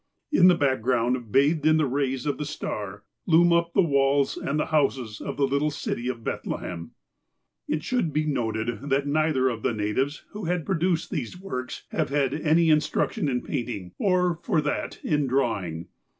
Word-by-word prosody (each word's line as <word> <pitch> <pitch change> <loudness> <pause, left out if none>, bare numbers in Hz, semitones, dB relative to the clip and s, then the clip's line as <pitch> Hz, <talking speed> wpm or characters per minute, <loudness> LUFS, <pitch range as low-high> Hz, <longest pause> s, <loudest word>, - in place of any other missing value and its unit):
In 180 -11 +6
the 180 - +6
background, 125 -4 0
bathed 145 +6 +3
in 155 0 +5
the 155 - +2
rays 135 -1 -1
of 145 - -1
the 150 - -2
star, 105 -8 -5 0.2
loom 170 +1 +5
up 170 0 +1
the 195 - +5
walls 140 -2 +2
and 150 +2 -2
the - - +1
houses 130 -7 0
of - - -5
the 140 - +3
little 140 +3 +1
city 125 -4 -4
of 120 -3 -4
Bethlehem. 85 -5 -5 0.7
It 155 0 -1
should 220 -5 0
be 155 +1 0
noted 120 -1 -2
that 140 +1 +2
neither 145 -2 +2
of 115 -3 -2
the 120 - 0
natives, 110 +8 -1
who 210 -2 -6
have 175 0 0
l^roduced 175 -1 0
these 150 - -4
works, 130 -10 -5
have - - -1
had 140 -2 +1
any 160 +1 +3
instruction 150 -1 +1
in 125 -2 -1
paint 125 -4 -3
ing, 95 -6 -6
or, 180 -3 +2
for - - +1
that, 150 0 -2
in 150 -2 +1
drawing. 100 -11 -1
140 Hz, 180 wpm, -26 LUFS, 125-155 Hz, 0.7 s, In